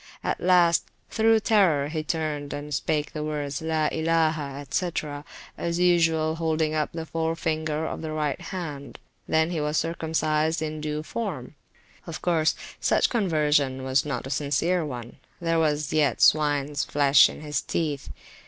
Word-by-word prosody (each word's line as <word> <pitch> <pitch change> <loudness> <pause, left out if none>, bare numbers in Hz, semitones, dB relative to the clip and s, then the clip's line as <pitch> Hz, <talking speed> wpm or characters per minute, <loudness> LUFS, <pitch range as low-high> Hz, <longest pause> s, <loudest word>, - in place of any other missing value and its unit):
At - - -2
last, 175 -2 +4 0.3
through 225 0 +3
terror, 180 -11 +3
he 155 0 -2
turned 150 -3 -3
and 145 +1 -6
spake 150 +2 -1
the 150 - -3
words 145 -2 -3
(la 160 -1 0
ilaha, 160 -3 0
&c.), 180 -2 0 0.7
as 170 0 -1
usual 165 -3 +2
holding 160 -1 0
up 155 -1 -1
the 165 -1 -5
forefinger 160 -1 -2
of - - -4
the 160 -1 -4
right 155 +1 -2
hand; 160 -6 -6 0.3
he 160 0 +1
was 150 +1 0
then 165 - -1
circumcised 160 -1 0
in 155 -1 -4
due 150 0 -3
form. 160 - -5 0.5
Of 165 - -5
course, 160 -3 +2 0.2
such - - +2
conversion 150 - +1
was 130 +2 +2
not 140 -6 -4
a 135 - -6
sincere 150 +5 +1
onethere 145 +5 -4
was 150 -2 0
yet 145 -6 +2
swines 145 -1 +3
flesh 140 -1 +5
in - - -9
his 150 -1 -2
teeth. 150 -4 -3
155 Hz, 150 wpm, -25 LUFS, 150-165 Hz, 0.7 s, flesh